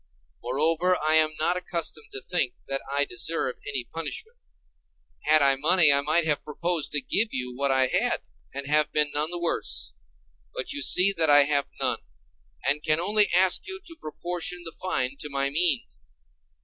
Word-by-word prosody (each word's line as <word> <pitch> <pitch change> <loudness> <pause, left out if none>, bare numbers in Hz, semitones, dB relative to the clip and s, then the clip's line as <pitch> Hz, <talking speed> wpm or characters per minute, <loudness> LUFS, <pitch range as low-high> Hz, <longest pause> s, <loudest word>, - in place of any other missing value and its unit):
Moreover, 160 +8 +1
I 155 +1 +1
am 155 -1 +4
not 175 +3 +1
accustomed 170 -4 -3
to 135 - -5
think 165 -9 -1
that 135 0 -3
I 145 0 +1
deserve 125 +2 -4
any 135 -3 -3
punishment. 440 - -8 0.9
Had 155 -1 +5
I 135 -1 +4
money 160 +1 +5
I 140 - +3
might 155 +3 +1
have 150 -2 +1
proposed 170 +1 -1
to 145 - +1
give 220 +10 0
you 125 -1 -4
what 140 +2 0
I 130 -1 +3
had, - - +2 0.3
and 140 0 -6
have 150 +1 +2
been 150 -1 0
none 150 +2 0
the 175 - -3
worse. 165 - -3 0.6
But 130 - -4
you 145 - -5
see 180 +8 +5
that 160 -3 +3
I 145 0 +8
have 140 0 0
none, - - -2 0.7
and 145 +2 0
can 155 +1 +1
only 210 +3 +2
ask 185 - +4
you 380 0 -4
to 330 - -10
proportion 175 - -4
the 165 - -9
fine 140 -8 -2
to 150 - -6
my 140 0 -2
means. 150 - -1
155 Hz, 180 wpm, -25 LUFS, 140-175 Hz, 0.9 s, I